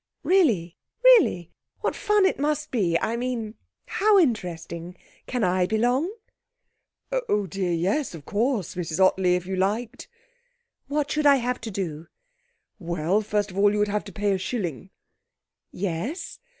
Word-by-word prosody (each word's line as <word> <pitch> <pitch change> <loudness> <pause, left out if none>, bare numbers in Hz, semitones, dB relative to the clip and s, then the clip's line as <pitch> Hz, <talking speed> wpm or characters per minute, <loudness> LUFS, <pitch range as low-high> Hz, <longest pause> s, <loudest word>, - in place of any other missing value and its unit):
'Really? 265 - +2 0.2
Really? 420 - +5 0.3
What - - -1
fun 420 -2 +2
it 380 - +1
must 300 +1 -1
be; 175 -9 +1
I 230 - -1
mean 235 -3 -3 0.3
how 415 +1 +3
interesting. 175 - -1 0.3
Can 250 -3 -1
I 180 -1 +2
belong?' 245 - +1 1.2
'Oh, 205 -1 +1
dear 185 0 -2
yes, 185 - 0
of 150 -3 -11
course, 220 - -1
Mrs 170 -1 -4
Ottley. 185 -1 +4
If 180 0 -3
you 190 +1 -3
liked.' 210 +5 -2 0.8
'What 290 0 -1
should 305 -1 +2
I 280 - +7
have 250 -1 -2
to 230 - -5
do?' 170 -6 -5 0.7
'Well, 170 +3 0
first 205 -1 -1
of 190 - -4
all 205 0 +5
you 210 - -1
would 210 0 +1
have 210 +1 -1
to - - -9
pay 205 -1 0
a 190 - 0
shilling.' 180 - -4 0.8
'Yes?' 200 - -4
205 Hz, 150 wpm, -25 LUFS, 180-255 Hz, 1.2 s, I